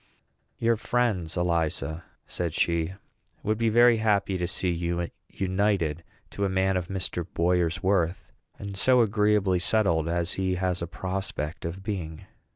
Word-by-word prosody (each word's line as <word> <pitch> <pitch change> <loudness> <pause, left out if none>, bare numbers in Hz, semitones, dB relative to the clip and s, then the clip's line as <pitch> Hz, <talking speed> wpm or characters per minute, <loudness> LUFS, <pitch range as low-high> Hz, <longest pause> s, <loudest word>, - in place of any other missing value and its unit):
"Your 115 0 +2
friends, 105 -9 0
Eliza," 85 -2 -1 0.2
said 85 -3 -3
she, 85 +2 0 0.5
"would 110 +1 0
be 115 -1 +2
very 120 +1 +6
happy 100 -3 +1
to 90 -1 -1
see 95 -1 0
you 85 0 -2 0.2
united 95 -4 0 0.3
to 100 - -3
a 100 - +2
man 95 0 +1
of 90 -2 -1
Mr. 95 -2 -2
Boyer's 90 +1 +1
worth, 95 -2 +1 0.3
and 100 -1 -6
so 125 +5 +4
agreeably 105 -3 +2
settled 85 -5 +2
as 85 +1 0
he 95 -1 0
has 90 -1 -1
a 85 - -2
prospect 85 -3 -4
of 90 +3 -5
being." 90 -7 -5
95 Hz, 150 wpm, -27 LUFS, 85-100 Hz, 0.5 s, very